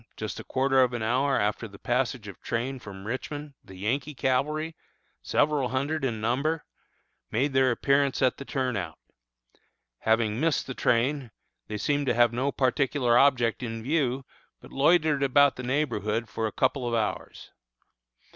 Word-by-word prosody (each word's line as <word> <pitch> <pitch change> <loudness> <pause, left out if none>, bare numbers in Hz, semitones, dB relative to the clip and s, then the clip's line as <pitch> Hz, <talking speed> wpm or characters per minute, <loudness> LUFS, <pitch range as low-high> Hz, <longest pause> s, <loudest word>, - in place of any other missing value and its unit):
just 110 -1 -5
a - - -7
quarter 135 0 +2
of 125 -1 +2
an 120 -2 -3
hour 130 +5 +2
after 105 +2 -1
the 100 -1 -13
passage 120 -1 -1
of 100 - -10
train 125 +3 -3
from 100 -4 -10
Richmond, 145 +5 -5
the 95 - -13
Yankee 130 +10 -2
cavalry, 150 +5 0 0.5
several 145 -3 +1
hundred 140 +4 -1
in 120 -5 -1
number, 140 +8 0 0.6
made 135 +5 0
their 130 -1 +4
appearance 140 +2 +2
at 130 -1 +2
the - - -7
Turnout. 125 - -3 1.0
Having 110 0 +1
missed 160 -1 +1
the 130 - -5
train, 130 +2 +1 0.4
they 105 - -4
seemed 145 +6 0
to 120 - +2
have 120 -1 +4
no 130 +4 0
particular 130 -2 +1
object 120 -4 +3
in 115 -2 -5
view, 135 -2 0 0.3
but - - -15
loitered 150 0 +3
about 140 +1 +4
the - - -6
neighborhood 120 -5 -1
for 110 +1 -2
a - - -5
couple 130 -1 0
of 120 - 0
hours. 110 -2 -3
130 Hz, 160 wpm, -27 LUFS, 115-140 Hz, 1.0 s, their